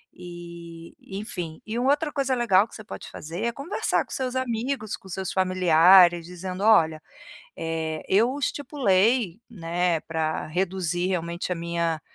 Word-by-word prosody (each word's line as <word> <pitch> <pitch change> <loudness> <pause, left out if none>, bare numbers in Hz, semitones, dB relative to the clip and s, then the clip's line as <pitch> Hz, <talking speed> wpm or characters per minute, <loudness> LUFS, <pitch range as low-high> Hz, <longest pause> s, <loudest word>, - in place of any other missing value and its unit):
eh, 170 -1 -10
enfim. 180 -5 -6
E 220 +2 -3
uma 260 +3 +3
outra 295 +1 0
coisa 275 -3 0
legal 225 -4 +3
que - - -21
você 215 - -9
pode - - -9
fazer, 165 +3 -6
é 235 - +1
conversar 275 - -1
com - - -32
seus 260 -1 -3
amigos, 245 -2 -2
com - - -17
seus 190 +1 -4
familiares 180 -1 +5
dizendo: 180 +2 -6
"Olha, 160 -8 +4 0.6
eh, 160 -1 -3
eu 230 +7 +3
estipulei, 235 - +1
né, 175 -4 -1
pra 160 -1 -2
reduzir 180 +1 -1
realmente 170 0 -3
a - - 0
minha 170 -1 -2
185 Hz, 150 wpm, -25 LUFS, 170-225 Hz, 0.6 s, familiares